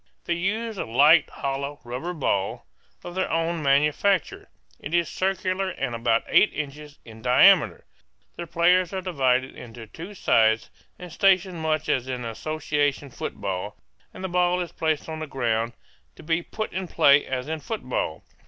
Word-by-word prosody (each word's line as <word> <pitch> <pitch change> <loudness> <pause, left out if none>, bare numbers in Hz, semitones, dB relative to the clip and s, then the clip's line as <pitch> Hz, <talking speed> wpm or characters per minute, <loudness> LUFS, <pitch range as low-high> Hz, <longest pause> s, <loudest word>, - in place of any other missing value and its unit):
They 170 - 0
use 210 +5 -2
a - - -2
light 145 +8 +5
hollow 140 +1 -4
rubber 125 +9 -5
ball, 100 - -1 0.4
of 175 - -7
their 190 +1 -1
own 165 0 0
manufacture. 150 +6 +1 0.3
It 160 - -4
is 170 -2 +2
circular 190 0 -1
and 135 -8 -4
about 115 -1 +1
eight - - +4
inches 150 0 -6
in 110 -1 -12
diameter. 125 - +5 0.5
The 170 - -6
players 175 +2 +3
are 190 - -2
divided 130 -7 0
into 115 -1 -10
two 170 - -10
sides, 110 - +2 0.3
and 180 -2 -10
stationed 185 -2 +2
much 155 -1 -1
as 130 -1 0
in 125 -2 -4
association 145 +2 -2
football, 100 -2 -5 0.3
and - - -10
the - - -1
ball 180 0 +1
is 175 -2 -4
placed 160 -3 -1
on 160 -1 -5
the 155 - -5
ground 115 -3 -1 0.4
to - - -14
be 165 +2 0
put 215 +5 -5
in 185 +1 -3
play 140 -2 +5
as 130 0 -4
in 160 0 -3
football. - - -4
155 Hz, 160 wpm, -25 LUFS, 130-180 Hz, 0.5 s, light